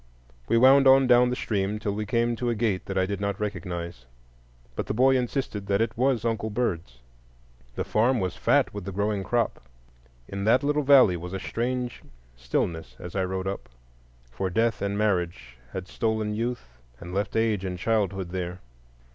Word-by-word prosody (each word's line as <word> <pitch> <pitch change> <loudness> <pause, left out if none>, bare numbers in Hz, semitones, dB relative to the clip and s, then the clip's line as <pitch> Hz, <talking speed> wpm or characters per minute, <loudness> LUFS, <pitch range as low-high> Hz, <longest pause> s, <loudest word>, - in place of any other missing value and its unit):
We 115 - +3
wound 135 +3 +7
on 135 0 +7
down 125 0 +5
the 125 - -1
stream 105 -3 -1
till 105 -1 -2
we 105 0 -4
came 115 +2 +1
to 120 0 -1
a 120 - 0
gate 105 -4 -1
that 95 - -3
I 95 - +3
did 100 0 -4
not 100 0 -2
recognize, 85 -9 -5 0.7
but - - -3
the - - -2
boy 130 +3 +5
insisted 120 -5 -2
that 100 0 +2
it 115 - 0
was 125 -2 +1
"Uncle 110 -1 -1
Bird's." 90 - -2 0.8
The - - -1
farm 120 +3 +2
was 90 -2 -2
fat - - +2
with 100 -3 -6
the 100 - -4
growing 100 +1 -1
crop. 120 +3 -1 0.7
In 100 0 -5
that 120 +5 +4
little 150 +1 +1
valley 130 -10 +6
was 90 +2 -7
a 95 - -3
strange 125 +4 -3 0.3
stillness 65 +3 -2
as 90 - -9
I 95 - +1
rode 95 0 -3
up; 95 +1 -5 0.6
for 80 +10 -2
death 115 +4 +1
and 100 0 -1
marriage 85 -11 -1 0.2
had 95 -1 -6
stolen 110 -1 -1
youth 110 - -4 0.2
and 90 +1 -8
left 100 +1 -2
age 110 -3 +1
and 90 -1 -3
childhood 95 -3 0
there. 90 0 -4
105 Hz, 185 wpm, -26 LUFS, 95-120 Hz, 0.8 s, wound